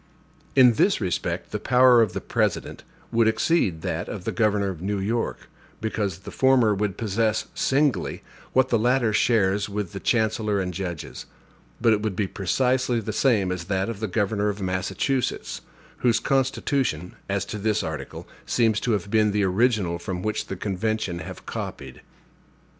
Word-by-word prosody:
In 125 -3 +7
this 195 - +2
respect 95 -4 -2
the - - -2
power 125 -1 +5
of 105 -5 +1
the - - -3
President - - -1 0.3
would 115 -1 +3
exceed 110 - +1
that - - -3
of - - -6
the - - -2
governor 105 -3 +1
of 90 -4 -6
New 100 +2 -1
York, 110 +4 -2 0.3
because 105 -5 -2
the - - -9
former 130 -5 +4
would 100 -1 -2
possess, 110 0 0
singly, 140 0 0 0.3
what 130 0 +3
the 115 - +2
latter 120 -1 +2
shares 105 -3 +2
with 105 -1 -3
the 100 - -6
chancellor 110 -2 +1
and 90 -1 -2
judges; 85 -3 -6 0.5
but 115 -1 +4
it 105 - 0
would 105 -3 -2
be 105 - 0
precisely 125 +6 0
the 110 -1 -4
same 105 -7 +2
with 90 -2 -4
that 95 +1 0
of 115 -4 -5
the 110 - -2
governor 105 +1 0
of 100 0 -4
Massachusetts, 95 +8 -2 0.4
whose 120 -2 +2
constitution, 135 - 0 0.2
as 100 0 0
to 105 - -6
this 105 +1 0
article, 75 -4 -6 0.2
seems 110 -3 +2
to 120 - 0
have 100 -1 -2
been 110 -1 +4
the 105 0 +1
original 95 -3 +1
from 90 +1 -5
which 110 0 -2
the 95 - -4
convention 100 -1 -2
have - - -9
copied. 65 -2 -6
105 Hz, 170 wpm, -24 LUFS, 95-115 Hz, 0.5 s, In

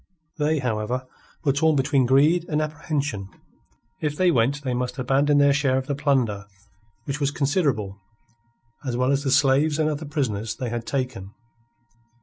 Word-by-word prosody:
They, 155 +1 +2
however, 125 0 -2 0.4
were 140 -3 +2
torn 155 +2 +2
between 135 -2 +2
greed 155 +7 +3
and 150 - 0
apprehension. 145 -9 -3 0.7
If 150 -2 -2
they 185 -1 +4
went 140 +2 +1
they 130 -2 -1
must 125 0 -3
abandon 140 +3 +2
their 140 0 +5
share 140 -2 +1
of 130 - -2
the 140 - -2
plunder, 130 -8 0 0.6
which 140 +3 -4
was 140 -2 +1
considerable, 140 - -1 0.8
as 125 -3 -2
well 125 +2 +2
as 140 0 +1
the 135 - -1
slaves 140 +3 +3
and 155 -1 +1
other 155 0 -3
prisoners 115 -8 -2
they 125 - -4
had 120 0 -4
taken. 125 -8 -4
140 Hz, 160 wpm, -24 LUFS, 125-150 Hz, 0.8 s, their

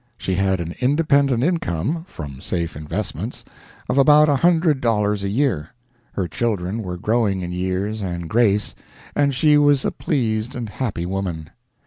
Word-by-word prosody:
She 95 - -2
had 95 0 +1
an 85 0 -4
independent 140 -2 +2
income 160 - -1
from 70 - -8
safe 85 -2 -2
investments 75 0 -5 0.4
of 135 - +1
about 150 +2 +6
a 145 - +3
hundred 165 -2 +3
dollars 105 -3 +1
a 100 - -1
year; 115 - -1 0.4
her 95 -3 -2
children 105 +2 -2
were 90 -3 -5
growing 105 -1 +1
in 90 - -4
years 95 +4 -2
and 85 -3 -4
grace; 105 0 +2 0.4
and 140 -2 +2
she 150 +2 +4
was 145 -2 +4
a - - +1
pleased 115 -3 -1
and 120 -3 -4
happy 105 -10 -3
woman. 90 -4 -4
110 Hz, 155 wpm, -21 LUFS, 90-140 Hz, 0.4 s, about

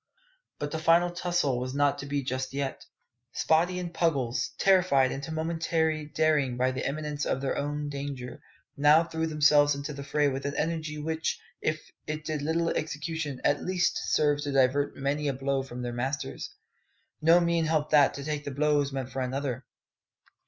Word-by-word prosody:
But 145 0 -4
the 160 - -2
"final 170 +2 +4
tussle" 175 -7 0
was 130 +1 -4
not 145 0 +2
to 140 - -6
be 140 0 -1
just 130 +1 -3
yet. 140 -1 -3 0.5
Spottie 170 +3 +2
and 175 -1 -5
Puggles, 130 -8 0
terrified 180 -9 +4
into 140 +4 -5
momentary 160 -1 0
daring 150 -5 +1
by 130 +1 +2
the 130 - -4
imminence 150 0 -3
of - - 0
their 135 0 -1
own 145 +1 -2
danger, 140 -3 -6 0.3
now 150 +3 +5
threw 160 -1 -2
themselves 150 -2 +4
into 140 +1 -5
the 140 0 -7
fray 145 +1 +1
with 135 0 -2
an 140 - -4
energy 160 -1 -2
which, 160 +1 -2 0.2
if 155 0 -2 0.2
it 155 0 -4
did 155 -2 -2
little 165 +3 0
execution, 155 -2 -3
at 145 0 +2
least 180 -1 +1
served 145 -1 +2
to 145 - -2
divert 135 +1 +2
many 145 +2 -1
a 140 - +1
blow 135 +1 -1
from 125 -2 -7
their 120 -1 -3
masters. 135 +4 -3 0.7
No 165 +3 +6
mean 170 -1 +1
help 155 -1 0
that 145 -3 +5
to 140 - -6
take 150 0 -3
the - - -4
blows 145 0 +1
meant 135 -1 -4
for 130 0 -3
another. 130 0 -3
145 Hz, 180 wpm, -28 LUFS, 135-160 Hz, 0.7 s, No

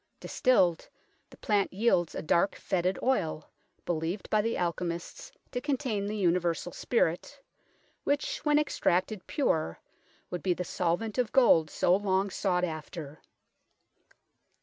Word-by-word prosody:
Distilled, 185 - +2 0.4
the - - -16
plant 205 -2 +1
yields 185 -4 +1
a - - -4
dark, 170 +5 +2
foetid 185 0 -1
oil, 165 - 0 0.4
believed 170 +3 -3
by 215 - +4
the 230 +2 -1
alchemists 170 -1 -3 0.2
to 245 - -3
contain 255 -8 -1
the 215 +1 -3
universal 175 -2 +1
spirit, 230 - -1 0.6
which, 290 +1 -1
when 295 -1 +2
ex 300 0 -1
tracted 185 +2 +1
pure, 160 - 0 0.5
would 180 - -3
be 180 -2 +1
the 180 - -3
solvent 180 +8 -1
of 245 - 0
gold 170 -12 +5
so 175 - +3
long 195 0 0
sought 180 -2 0
after. 155 -2 -5
185 Hz, 130 wpm, -29 LUFS, 170-225 Hz, 0.6 s, gold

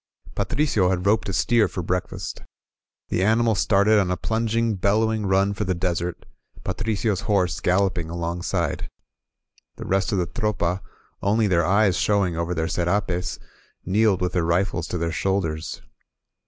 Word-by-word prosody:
Patricio 120 -11 +1
had 90 0 -1
roped 105 0 +2
a - - -2
steer 115 0 +3
for 90 0 -5
breakfast. 90 +2 -3 0.7
The 90 - 0
ani 110 +3 +3
mal 115 -1 +3
started 105 +1 +3
on 95 -3 +1
a 90 - 0
plunging, 115 0 0
bellowing 105 +2 +1
run 95 +1 +2
for 100 - -2
the 95 -2 -1
desert, 85 -1 -2 0.4
Patricio's 105 -2 -1
horse 95 -4 +1
galloping 90 -3 +1
alongside. 85 -1 -2 0.9
The - - -8
rest 95 -1 +1
of 100 - +1
the 90 - +1
Tropa, 95 -2 -1 0.4
only 110 +3 +2
their 85 -4 +2
eyes 100 -1 +3
showing 100 -5 +1
over 85 +2 -2
their 80 0 -1
serapes, 90 +1 -1 0.5
kneeled 100 0 +2
with 90 - -1
their 90 - +1
rifles 85 +1 0
to 90 - -3
their 85 0 -1
shoulders. 80 -3 -2
95 Hz, 155 wpm, -23 LUFS, 90-105 Hz, 0.9 s, steer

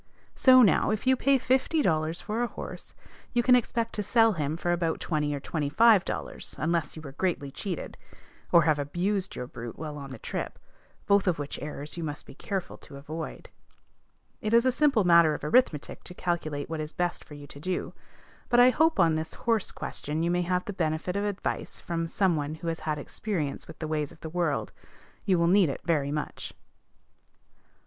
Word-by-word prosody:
So 255 -1 +7
now, 205 - +4
if 215 +2 -1
you 260 0 +5
pay 275 +2 +3
fifty 265 +5 +1
dollars 160 -2 +1
for 220 +3 -2
a 240 - +1
horse, - - -9 0.4
you 240 -1 +2
can 250 0 +6
expect 230 -1 0
to 210 - -2
sell 225 +2 +4
him 155 -2 -2
for 175 0 -1
about 170 -2 0
twenty 150 -3 -1
or - - -4
twenty 145 +1 -2
five 220 +2 +6
dollars, - - -4
unless 165 -2 -1
you 155 - -9
were 140 - -8
greatly 145 -3 -2
cheated, 180 +2 -5 0.5
or 170 -2 +7
have 155 -2 +2
abused 180 +7 -1
your 125 - -4
brute 120 -1 -8
while 150 -2 -6
on 140 -1 -8
the 130 - -8
trip, - - -5 0.5
both 200 -1 +3
of 180 - +2
which 145 0 -5
errors 150 +1 -6
you 170 - -3
must 150 -1 -5
be - - -12
careful 195 -3 -4
to 140 - -12
avoid. 155 +3 -7 0.9
It 215 +2 +1
is 235 +2 +5
a 255 - +4
simple 265 -5 +3
matter 170 -3 +6
of - - -9
arithmetic 150 - +1
to 180 - -9
calculate 155 -6 -2
what 160 -1 -4
is 155 0 -6
best 175 -1 -2
for 150 - -12
you 145 0 -10
to 140 - -11
do; 185 +4 -3 0.6
but 240 - +4
I 250 +1 +8
hope 320 +4 +2
on 165 -2 +5
this 160 0 -3
horse 225 -3 0
question 155 +3 -4
you 170 - +1
may 175 0 +1
have 180 +1 0
the 205 - -4
benefit 160 +1 -1
of 200 +1 0
advice 205 -2 -3
from 165 -1 -3
some 185 0 +1
one 150 0 -3
who 165 +1 -4
has 165 - -3
had 155 -1 -2
experience 155 -1 -4
with 160 - -11
the 155 - -4
ways 150 -2 -2
of - - -17
the 160 - -6
world. 170 -4 -1 0.5
You 190 -3 +3
will 170 - +3
need 185 -2 +5
it 135 - -5
very 150 -4 +1
much. 150 0 -4
170 Hz, 205 wpm, -28 LUFS, 150-205 Hz, 0.9 s, I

